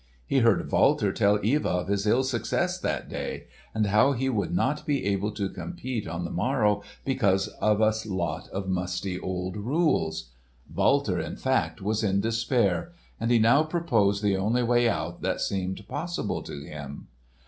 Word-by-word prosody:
He 135 Hz, -, +2 dB
heard 115 Hz, -5 st, +2 dB
Walter -, -, +3 dB
tell 105 Hz, 0 st, +3 dB
Eva 145 Hz, +7 st, +2 dB
of 90 Hz, 0 st, -1 dB
his 100 Hz, +1 st, 0 dB
ill 120 Hz, +5 st, +4 dB
success 130 Hz, -3 st, -1 dB
that -, -, -2 dB
day, -, -, -5 dB, 0.3 s
and 110 Hz, -1 st, 0 dB
how 105 Hz, +8 st, +4 dB
he 135 Hz, +1 st, -1 dB
would 110 Hz, -6 st, -1 dB
not 150 Hz, -4 st, 0 dB
be 140 Hz, -6 st, -1 dB
able 100 Hz, +1 st, 0 dB
to 100 Hz, -2 st, -2 dB
compete 130 Hz, -, -5 dB
on 85 Hz, +2 st, -4 dB
the -, -, -5 dB
morrow 105 Hz, -1 st, +1 dB, 0.2 s
because 100 Hz, -8 st, +2 dB
of 105 Hz, -1 st, +3 dB
a 110 Hz, 0 st, +4 dB, 0.2 s
lot 85 Hz, -5 st, -2 dB
of 95 Hz, 0 st, -5 dB
musty 90 Hz, 0 st, -2 dB
old 90 Hz, 0 st, -4 dB
rules. 105 Hz, -, 0 dB, 0.4 s
Walter, -, -, +2 dB
in -, -, -4 dB
fact, -, -, -1 dB
was 110 Hz, +2 st, 0 dB
in 100 Hz, -1 st, +2 dB
despair 115 Hz, -, 0 dB, 0.3 s
and 115 Hz, -, -1 dB
he 120 Hz, -, +5 dB
now 115 Hz, +6 st, +5 dB
proposed 115 Hz, -, +1 dB
the 100 Hz, -2 st, +2 dB
only 110 Hz, +6 st, +1 dB
way 120 Hz, 0 st, +3 dB
out -, -, -3 dB
that -, -, -1 dB
seemed 95 Hz, +1 st, -3 dB
possible 175 Hz, +6 st, -3 dB
to 70 Hz, -, -8 dB
him. 75 Hz, -1 st, -8 dB
105 Hz, 170 wpm, -27 LUFS, 95-125 Hz, 0.4 s, he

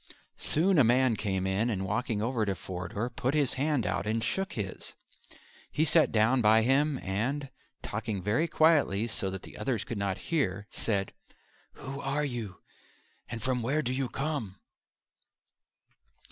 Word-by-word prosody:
Soon 175 Hz, +2 st, +2 dB
a -, -, +7 dB
man 120 Hz, 0 st, +4 dB
came 95 Hz, -3 st, -1 dB
in, 100 Hz, +5 st, +1 dB
and 95 Hz, -4 st, -1 dB
walking 110 Hz, +1 st, -1 dB
over 120 Hz, -1 st, 0 dB
to 100 Hz, -2 st, 0 dB
Forder 90 Hz, +5 st, -4 dB
put 130 Hz, +4 st, -1 dB
his 145 Hz, -4 st, +3 dB
hand 140 Hz, -2 st, 0 dB
out -, -, -1 dB
and 110 Hz, +1 st, 0 dB
shook 190 Hz, +11 st, -1 dB
his. 100 Hz, -4 st, -5 dB, 0.8 s
He 155 Hz, -, +2 dB
sat 160 Hz, +1 st, +4 dB
down 115 Hz, +4 st, +3 dB
by 110 Hz, +1 st, +5 dB
him 140 Hz, +3 st, +3 dB
and, 130 Hz, +9 st, -2 dB, 0.3 s
talking 110 Hz, -2 st, -3 dB
very 115 Hz, -, +1 dB
quietly 150 Hz, -11 st, +3 dB
so 105 Hz, -4 st, -1 dB
that 95 Hz, -1 st, -6 dB
the -, -, -11 dB
others 110 Hz, 0 st, -1 dB
should 115 Hz, -, -4 dB
not 100 Hz, -2 st, -1 dB
hear, 100 Hz, -, 0 dB
said: 100 Hz, -4 st, -1 dB, 0.6 s
"Who 135 Hz, +1 st, -7 dB
are 145 Hz, +2 st, 0 dB
you, 115 Hz, -8 st, -5 dB, 0.7 s
and 115 Hz, -, -6 dB
from 130 Hz, -1 st, 0 dB
where 140 Hz, +7 st, 0 dB
do 125 Hz, 0 st, -1 dB
you 130 Hz, -1 st, -1 dB
come?" 135 Hz, -11 st, -3 dB
115 Hz, 160 wpm, -29 LUFS, 105-140 Hz, 0.8 s, a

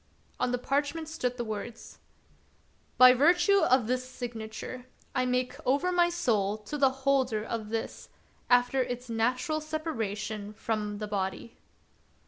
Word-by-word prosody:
On 250 Hz, -1 st, +1 dB
the 250 Hz, -, +1 dB
parchment 285 Hz, +5 st, -1 dB
stood 255 Hz, -6 st, -3 dB
the 240 Hz, -, -2 dB
words: 220 Hz, +1 st, -7 dB, 0.3 s
— -, -, -35 dB
" -, -, -38 dB
By 255 Hz, 0 st, +9 dB
virtue 355 Hz, -, +4 dB
of 255 Hz, -, +3 dB
this 250 Hz, +2 st, 0 dB
my 255 Hz, -, -11 dB
signature, 240 Hz, +1 st, -6 dB, 0.3 s
I 255 Hz, 0 st, +1 dB
make 250 Hz, 0 st, -1 dB
over 285 Hz, +8 st, +2 dB
my 350 Hz, -1 st, +4 dB
soul 220 Hz, -, 0 dB
to 215 Hz, +7 st, -7 dB
the 275 Hz, -2 st, +4 dB, 0.2 s
holder 260 Hz, -6 st, +2 dB
of 220 Hz, -2 st, -4 dB
this, 225 Hz, 0 st, -4 dB, 0.4 s
after 245 Hz, +2 st, +4 dB
its 245 Hz, -1 st, -4 dB
natural 250 Hz, +8 st, 0 dB
separation 220 Hz, -10 st, -4 dB
from 210 Hz, -1 st, -3 dB
the 210 Hz, 0 st, -4 dB
body." 200 Hz, +2 st, -3 dB
250 Hz, 150 wpm, -29 LUFS, 220-275 Hz, 0.4 s, By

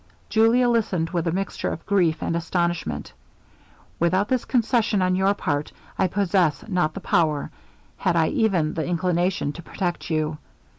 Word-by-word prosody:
Julia 230 Hz, +3 st, +4 dB
listened 195 Hz, -8 st, 0 dB
with 175 Hz, -2 st, -1 dB
a -, -, +2 dB
mixture 195 Hz, +3 st, -2 dB
of 165 Hz, -, -7 dB
grief 175 Hz, -6 st, +1 dB
and 165 Hz, -, -1 dB
astonishment. 170 Hz, -, -2 dB, 0.9 s
'Without 185 Hz, +5 st, +2 dB
this 255 Hz, -2 st, 0 dB
concession 230 Hz, -3 st, +1 dB
on 185 Hz, 0 st, +2 dB
your 195 Hz, +2 st, +2 dB
part, 145 Hz, -5 st, -2 dB, 0.2 s
I 190 Hz, -, +2 dB
possess 185 Hz, -5 st, +1 dB
not 180 Hz, -6 st, 0 dB
the -, -, -4 dB
power, 160 Hz, -8 st, +1 dB, 0.5 s
had -, -, 0 dB
I -, -, +3 dB
even 195 Hz, -, +1 dB
the 160 Hz, -, -2 dB
inclination, 175 Hz, -2 st, 0 dB
to 170 Hz, -, -9 dB
protect 175 Hz, +1 st, -4 dB
you. 155 Hz, -1 st, -1 dB
180 Hz, 155 wpm, -24 LUFS, 165-200 Hz, 0.9 s, Julia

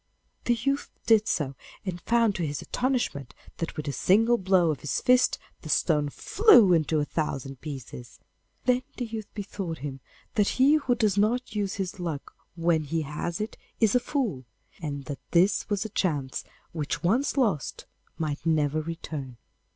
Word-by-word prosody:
The 240 Hz, -, +3 dB
youth 275 Hz, +5 st, -1 dB, 0.2 s
did 220 Hz, -1 st, +5 dB
so, 140 Hz, -5 st, 0 dB, 0.3 s
and 175 Hz, -2 st, -4 dB
found 230 Hz, -2 st, +3 dB
to 175 Hz, -, -3 dB
his 145 Hz, 0 st, -4 dB
astonishment 245 Hz, -, -1 dB, 0.2 s
that 165 Hz, -, -4 dB
with 150 Hz, -, -4 dB
a -, -, 0 dB
single 225 Hz, -, +3 dB
blow 185 Hz, -3 st, +3 dB
of 145 Hz, -, -4 dB
his 150 Hz, -, -1 dB
fist 250 Hz, 0 st, +4 dB, 0.2 s
the 155 Hz, -, -9 dB
stone 150 Hz, -2 st, +2 dB
flew 240 Hz, -, +6 dB
into 160 Hz, -1 st, +2 dB
a 145 Hz, -, +1 dB
thousand 135 Hz, -4 st, -3 dB
pieces. 130 Hz, -4 st, -8 dB, 0.5 s
Then 250 Hz, 0 st, +3 dB, 0.2 s
the 245 Hz, -, -2 dB
youth 220 Hz, -2 st, -6 dB
bethought 195 Hz, -5 st, -4 dB
him 135 Hz, -1 st, -6 dB, 0.3 s
that 205 Hz, -2 st, +3 dB
he 270 Hz, +3 st, +6 dB
who 260 Hz, -5 st, +1 dB
does 210 Hz, -4 st, +2 dB
not 230 Hz, +3 st, +1 dB
use 200 Hz, -2 st, -1 dB
his 190 Hz, -1 st, -4 dB
luck 165 Hz, -5 st, -4 dB, 0.2 s
when 165 Hz, -2 st, +1 dB
he 160 Hz, +2 st, -1 dB
has 155 Hz, +5 st, -4 dB
it 215 Hz, +2 st, -4 dB, 0.2 s
is 220 Hz, -3 st, +4 dB
a 250 Hz, -, +5 dB
fool, 240 Hz, -, -2 dB, 0.4 s
and 140 Hz, -3 st, -4 dB
that 145 Hz, -2 st, -5 dB
this 180 Hz, +4 st, +3 dB
was 205 Hz, 0 st, 0 dB
a -, -, -4 dB
chance 145 Hz, -10 st, -1 dB, 0.3 s
which 155 Hz, 0 st, -3 dB
once 240 Hz, +12 st, +2 dB
lost 205 Hz, -, 0 dB, 0.3 s
might 150 Hz, -2 st, -3 dB
never 155 Hz, -2 st, +2 dB
return. 150 Hz, -5 st, -6 dB
175 Hz, 170 wpm, -27 LUFS, 150-225 Hz, 0.5 s, flew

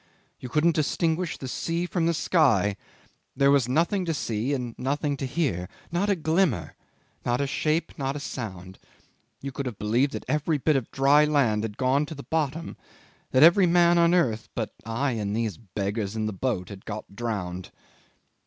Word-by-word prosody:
"You 125 Hz, -, -7 dB
couldn't 160 Hz, +5 st, +3 dB
distinguish 160 Hz, +2 st, 0 dB
the 130 Hz, -, -6 dB
sea 165 Hz, +6 st, -2 dB
from 175 Hz, -2 st, 0 dB
the 170 Hz, -, +2 dB
sky; 130 Hz, -, +3 dB, 0.6 s
there 140 Hz, 0 st, +4 dB
was 135 Hz, -4 st, +3 dB
nothing 170 Hz, +8 st, +1 dB
to 165 Hz, -2 st, -1 dB
see 115 Hz, -1 st, -2 dB
and 125 Hz, -4 st, -2 dB
nothing 145 Hz, +2 st, -1 dB
to 135 Hz, -, -3 dB
hear. 125 Hz, -, -1 dB, 0.2 s
Not 185 Hz, +5 st, 0 dB
a 200 Hz, -, +3 dB
glimmer, 160 Hz, -, 0 dB, 0.5 s
not 120 Hz, 0 st, 0 dB
a 140 Hz, -, +1 dB
shape, 155 Hz, +4 st, 0 dB
not 135 Hz, 0 st, -1 dB
a -, -, -3 dB
sound. 95 Hz, -10 st, -7 dB, 0.6 s
You 140 Hz, -, -4 dB
could 135 Hz, 0 st, -4 dB
have 115 Hz, -5 st, -5 dB
believed 120 Hz, +7 st, +1 dB
that -, -, -5 dB
every 150 Hz, +3 st, +1 dB
bit 150 Hz, +2 st, +2 dB
of 130 Hz, -4 st, -1 dB
dry 140 Hz, +2 st, +4 dB
land 135 Hz, -8 st, +2 dB
had 105 Hz, -2 st, -5 dB
gone 135 Hz, +3 st, +2 dB
to 160 Hz, -, -7 dB
the 140 Hz, -, -9 dB
bottom; 160 Hz, 0 st, -2 dB, 0.5 s
that 130 Hz, -, +5 dB
every 175 Hz, +3 st, +7 dB
man 170 Hz, 0 st, +4 dB
on 170 Hz, +1 st, +4 dB
earth 115 Hz, -11 st, +1 dB
but 110 Hz, -3 st, -3 dB
I 130 Hz, +5 st, 0 dB
and 105 Hz, -3 st, -2 dB
these 110 Hz, -6 st, -2 dB
beggars 100 Hz, +1 st, -3 dB
in 110 Hz, -1 st, -1 dB
the 110 Hz, -, -2 dB
boat 95 Hz, -4 st, -2 dB
had 100 Hz, -1 st, -10 dB
got 105 Hz, -2 st, -7 dB
drowned." 95 Hz, -6 st, -4 dB
135 Hz, 185 wpm, -26 LUFS, 110-160 Hz, 0.6 s, every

